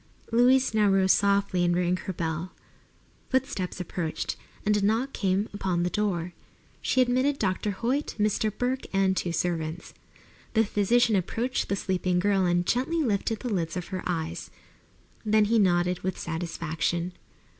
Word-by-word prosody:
Louise 250 +2 +4
now 210 -2 +4
rose 190 -1 +4
softly 200 -2 +2
and 175 0 +2
rang 180 0 +1
her 185 - -5
bell. 165 0 -3 0.8
Footsteps 235 -9 -1
approached, 170 -2 -3 0.3
and 210 0 +3
a 205 - +1
knock 225 +6 +1
came 195 +1 0
upon 185 -4 -1
the 180 - -1
door. 180 -5 -1 0.5
She 260 - +2
admitted 255 +3 +2
Dr. 195 -1 -1
Hoyt, 240 +9 -1
Mr. 215 0 +1
Burke, 250 +5 -2
and 195 -1 +2
two 180 -1 -1
servants. 165 0 -2 0.6
The 225 0 +4
physician 215 +3 +2
approached 230 +7 -1
the 200 - +1
sleeping 185 -2 0
girl 195 0 +2
and 175 0 +1
gently 305 - +1
lifted 215 -2 -1
the 245 -4 -2
lids 170 -2 -2
of 180 - -5
her 185 -1 -3
eyes. 165 -1 -3 0.7
Then 215 -1 +3
he 225 +2 +3
nodded 180 -2 +2
with 185 0 -3
satisfaction. 170 +1 -2
195 Hz, 155 wpm, -27 LUFS, 175-220 Hz, 0.8 s, Louise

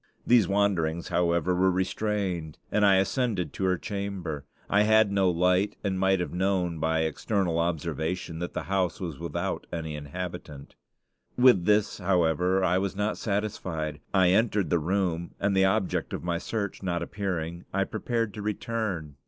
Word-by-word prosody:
These 120 -6 +5
wanderings, 90 -5 +1
however, 85 0 +1
were 95 +1 +3
restrained, 95 -3 -1
and 105 - +2
I 100 -1 +6
ascended 95 - 0
to 95 - -2
her 90 -1 +2
chamber. 95 -7 -4 0.2
I 105 - +3
had 110 -1 +4
no 95 -2 +3
light, 90 +3 +2
and 95 -2 -1
might 95 0 +3
have 90 - -3
known 90 -3 0
by 80 +1 +1
external 85 +2 0
observation 85 +1 -2
that 90 - -5
the - - -2
house 90 0 0
was 85 -7 -5
without - - -3
any 80 -3 -4
inhabitant. 75 -1 -7 0.6
With 125 -8 +6
this, 105 -1 +2
however, 90 0 +2
I 90 +1 +3
was 100 0 -2
not 105 +1 -1
satisfied. 95 -8 -2
I 95 -2 +4
entered 105 -1 +2
the 85 - +3
room, 85 0 -1
and 100 -1 +1
the 95 0 +5
object 95 0 0
of - - -4
my 85 -1 -1
search 100 0 -3
not 85 -3 -1
appearing, 85 -3 -4
I 100 0 +1
prepared 115 +1 -2
to 105 - -6
return. 100 -8 -3
95 Hz, 160 wpm, -27 LUFS, 85-100 Hz, 0.6 s, I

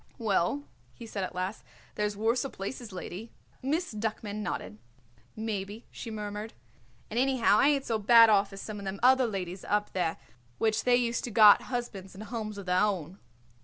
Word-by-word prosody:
"Well," 220 +5 +1 0.3
he 235 - -10
said 205 -3 -4
at 185 - -5
last, 185 +4 -3 0.3
"there's 210 -1 -2
worser 235 +5 +1
places, 220 +2 -6
lady." 185 +4 -7 0.3
Miss 305 +3 -1
Duckman 215 -1 -3
nodded. 105 - -4 0.6
"Maybe," 215 0 -4
she 230 - -7
murmured; 210 0 -5 0.6
"and 230 - 0
anyhow 255 -5 +3
I 275 - +5
ain't 280 -2 +2
so 225 -2 0
bad 230 +2 +8
off 205 -2 +3
as 195 0 -8
some 215 -1 -6
of 200 - -8
them 195 +1 -4
other 260 0 +5
ladies 185 -3 -5
up 210 0 -1
there 175 -3 0 0.4
which 220 -1 +1
they 250 -1 +5
used 235 -1 0
to - - -5
got 210 -2 +8
husbands 215 -7 -5
and 205 - -8
homes 215 -1 -5
of 200 - -7
their 180 0 +2
own." 190 -3 -1
215 Hz, 180 wpm, -29 LUFS, 195-235 Hz, 0.6 s, bad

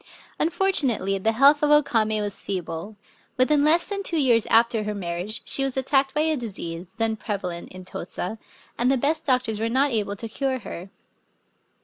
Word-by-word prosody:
Unfortunately 270 - +1
the 220 +4 +1
health 280 +5 +5
of 300 - +2
O 295 0 +6
Kame 215 -4 0
was 205 -1 -5
feeble. 185 +1 -5 0.4
Within 285 +3 +3
less 325 +3 +4
than 400 -1 -3
two 345 -4 +1
years 240 -6 +4
after 230 0 +3
her 210 0 -3
marriage 180 +3 -3
she 270 - +1
was 270 -1 -2
attacked 270 +1 +1
by 300 - +2
a 315 0 +1
disease, 185 - -5
then 225 -1 0
prevalent 185 -5 -5
in 185 0 -11
Tosa, 185 +4 -6 0.4
and 245 +2 +2
the 270 - +3
best 305 +5 0
doctors 250 -5 +1
were 225 +1 -1
not 270 +4 +2
able 205 -3 -1
to 225 +3 -5
cure 260 +4 -2
her. 190 -5 -8
230 Hz, 180 wpm, -24 LUFS, 205-275 Hz, 0.4 s, O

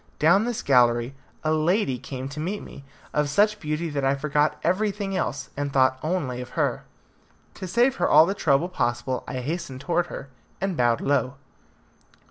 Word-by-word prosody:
Down 185 +8 +4
this 240 -2 -3
gallery 120 -1 +3 0.3
a 155 0 +1
lady 155 - +1
came 130 0 -6
to 140 +2 -7
meet 190 +7 -3
me, 140 - -11 0.3
of 150 -1 +1
such 210 +7 +2
beauty 155 +2 -2
that 140 -1 -2
I 135 +1 +2
forgot 150 +1 0
everything 200 0 0
else, 140 -6 -3
and 145 0 -3
thought 130 -1 +3
only 150 -7 -2
of 125 - -10
her. - - 0 0.7
To 185 - -7
save 240 +7 +2
her - - +1
all 155 +2 +8
the 195 - -1
trouble 160 -4 +2
possible, 125 -7 -2
I 130 - -4
hastened 145 -2 -4
towards 175 +2 0
her, 140 - -8 0.3
and 195 -2 -1
bowed 120 -4 +2
low. 135 -2 0
150 Hz, 175 wpm, -25 LUFS, 135-180 Hz, 0.7 s, all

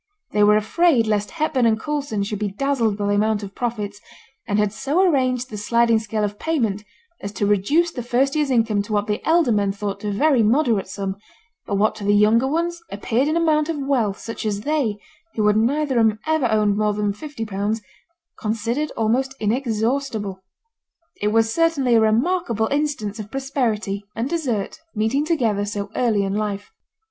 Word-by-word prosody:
They 210 - +3
were 210 0 +6
afraid 250 +3 +3
lest 210 -1 0
Hepburn 305 -6 +1
and 220 -1 +2
Coulson 280 -7 -2
should 205 0 -4
be 210 -1 -1
dazzled 235 -4 0
by 205 - -2
the 205 - +1
amount 210 0 +1
of 195 -1 -7
profits, 210 -4 -4 0.5
and 205 -2 0
had 210 -1 +1
so 295 +11 +1
arranged 255 -5 +1
the 210 - -5
sliding 235 +1 +3
scale 215 -1 -3
of 205 0 -3
payment 225 -11 -1 0.4
as 200 - -5
to 205 - -1
reduce 245 - +2
the 245 - -5
first 255 +4 +1
year's 300 -2 +1
income 225 -5 +2
to 205 +2 -5
what 205 0 +1
the 210 0 -2
elder 325 -5 +4
men 205 -2 +2
thought 200 0 -5
a 210 - -1
very 270 +4 +3
moderate 225 -3 +2
sum, 195 0 -4 0.5
but 200 - -1
what 215 +2 +2
to 210 - -7
the 205 +1 +3
younger 220 +5 +4
ones 340 +4 -1
appeared 225 +6 0
an 310 +2 +1
amount 310 -2 +2
of 325 - -1
wealth 255 -8 0
such 230 - -6
as 205 -2 -2
they, 275 -6 0 0.4
who 215 - +1
had 210 0 +4
neither 260 +3 +1
of 225 - +5
them 215 -1 0
ever 315 -5 +2
owned 210 -2 +2
much 215 - +1
more 210 0 +2
than 205 -1 -1
fifty 285 0 -6
pounds, 205 +2 -2 0.6
considered 230 +7 -1
almost 255 +4 0
inexhaustible. 225 -2 -1 0.8
It 205 - +1
was 225 +1 +2
certainly 325 -7 +2
a 225 - +5
remarkable 230 - +1
instance 280 -8 -1
of 210 -1 -7
prosperity 225 -7 -2
and 230 +3 -1
desert 270 -11 -2 0.2
meeting 225 +7 +1
together 235 - +1
so 205 0 -4
early 220 -5 +2
in 195 0 -2
life. 205 - -3
225 Hz, 190 wpm, -22 LUFS, 210-275 Hz, 0.8 s, were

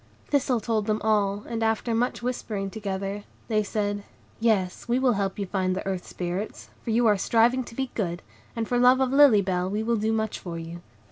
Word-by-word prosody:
Thistle 265 -4 +2
told 220 -2 -1
them 215 0 +1
all, 205 -2 +1
and, 230 -1 -3
after 225 +1 0
much 240 +1 0
whispering 210 -5 -3
together, 200 -1 -4 0.3
they 215 -1 +2
said,— 205 -1 -2 0.4
"Yes, 210 -5 +1
we 240 +1 +2
will 260 -1 +3
help 195 -2 -1
you 200 - -2
to 180 - -18
find 185 -2 0
the 190 - -4
Earth 190 -2 -3
Spirits, 180 +4 -5
for - - -7
you 230 +2 +3
are 210 -3 +4
striving 240 +5 +3
to 230 - -11
be 265 0 -2
good, 175 -5 -3 0.3
and 225 -1 -2
for 245 - +1
love 250 +1 +6
of 260 -1 +1
Lily 275 -8 +7
Bell 180 -1 -1
we 210 +2 -1
will 230 +1 +1
do 215 +1 0
much 220 -1 -1
for 170 -2 -6
you." 165 +1 -7
215 Hz, 215 wpm, -26 LUFS, 195-235 Hz, 0.4 s, Lily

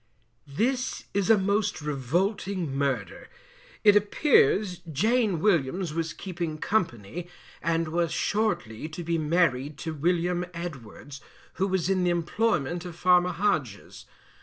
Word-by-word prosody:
This 250 - -1
is 200 -2 0
a 225 - +7
most 200 +1 0
revolting 160 - -1
Murder. 140 -2 -2 0.5
It 205 -2 +7
appears 205 - +3
Jane 215 - +2
Williams 170 -2 +1
was 165 -1 -2
keeping 170 -3 -5
company, 170 - -2 0.3
and 165 0 0
was 170 0 0
shortly 160 - -1
to 165 +2 -7
be 165 0 0
married 150 -3 +1
to 160 - -2
William 175 +3 0
Edwards, 145 -4 -8 0.4
who 195 - +3
was 185 -3 0
in 190 -1 +1
the 180 - +2
employment 175 -2 0
of 175 -2 -8
Farmer 180 +1 +4
Hodges. 165 - -2
175 Hz, 125 wpm, -27 LUFS, 155-195 Hz, 0.5 s, a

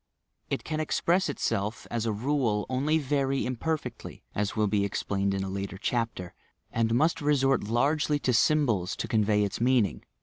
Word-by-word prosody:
It - - -2
can 155 -1 -3
express 170 +3 +1
itself, 105 -6 -2
as 115 -1 -1
a - - +1
rule, 115 -2 0
only 140 +5 +1
very 135 -2 0
imperfectly 130 0 -4
(as 105 0 -1
will 110 - +2
be 100 0 +1
explained 100 0 -1
in 95 - -1
a - - -3
later 95 0 -4
chapter), 115 -5 -2 0.4
and 115 0 +1
must 155 +6 +2
resort 135 -5 +2
largely 145 +7 +1
to 130 -3 0
symbols 115 -9 +2
to - - -4
convey 105 -1 +2
its 100 +2 -3
mean 125 -2 +4
ing. - - -7
120 Hz, 170 wpm, -28 LUFS, 105-145 Hz, 0.4 s, mean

